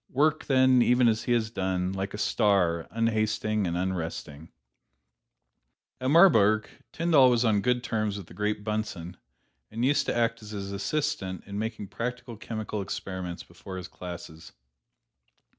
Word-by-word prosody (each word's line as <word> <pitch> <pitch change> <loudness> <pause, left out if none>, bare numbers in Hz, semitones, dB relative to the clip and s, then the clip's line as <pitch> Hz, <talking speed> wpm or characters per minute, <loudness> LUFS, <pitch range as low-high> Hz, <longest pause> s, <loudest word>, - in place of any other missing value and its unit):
Work, 150 +4 +1
then, 130 -2 +4
even 125 0 +4
as 110 -1 +1
he - - -1
has 110 -2 0
done 95 -3 -1
like 95 +1 -4
a - - -6
star, 90 -6 +1
unhasting 110 -2 0
and 85 0 -2
unresting." 85 -4 -4 1.5
At 130 - -1
Marburg, 110 - +5 0.2
Tyndall 160 -6 +4
was 120 0 +2
on 105 -3 +3
good 125 +3 +1
terms 110 -4 -1
with 100 - -8
the - - -15
great 105 0 -2
Bunsen, 105 -5 -4 0.5
and 115 +3 -2
used 145 +2 +2
to - - 0
act 115 0 0
as 105 - -10
his 100 0 -5
assistant 100 - -2
in 100 +1 -5
making 110 -3 -4
practical 120 +1 -5
chemical 110 -1 -5
experiments 95 -2 -5
before 95 +2 -10
his 90 -1 -6
classes. 85 -2 -9
105 Hz, 150 wpm, -27 LUFS, 95-120 Hz, 1.5 s, Marburg